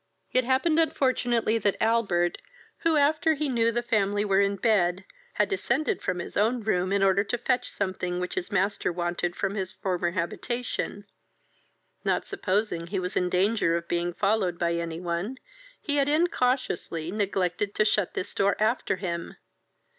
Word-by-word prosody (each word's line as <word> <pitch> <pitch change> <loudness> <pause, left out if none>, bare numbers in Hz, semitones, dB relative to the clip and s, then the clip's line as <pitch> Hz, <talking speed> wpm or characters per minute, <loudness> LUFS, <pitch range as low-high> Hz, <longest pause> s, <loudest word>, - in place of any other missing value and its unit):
It 255 -1 +2
happened 270 +6 +2
unfortunately, 245 -7 +1
that 205 -2 +1
Albert, 200 -7 +1 0.4
who, 330 -1 +2
after 310 +2 +3
he 300 +1 0
knew 230 -3 +2
the 240 +1 -1
family 205 -3 +1
were 195 -1 +3
in 200 0 +1
bed, 190 -4 +1 0.3
had - - +2
descended 305 - 0
from 180 - -1
his 175 - -6
own 225 +3 +1
room 185 -3 0
in 200 0 +2
order 195 +1 +4
to 245 - -1
fetch 250 +1 0
something 185 -2 -2
which 180 0 -3
his 180 - -3
master 195 0 +1
wanted 175 0 -2
from 195 - -1
his 190 -2 -3
former 180 -3 -1
habitation, 205 +4 -3 1.0
not - - 0
supposing 200 - -1
he 195 +2 -2
was 180 0 -4
in 180 - +1
danger 185 -1 +2
of 170 0 -3
being 175 0 0
followed 195 -2 +1
by 170 0 0
any 170 -1 -3
one, 175 +8 -3 0.5
had 285 -1 +3
incautiously 250 - 0
neglected 195 -1 -1
to 215 - +3
shut 210 -3 +1
this - - -3
door 200 0 +2
after 220 0 +1
him. 170 -3 -4
200 Hz, 160 wpm, -27 LUFS, 180-240 Hz, 1.0 s, order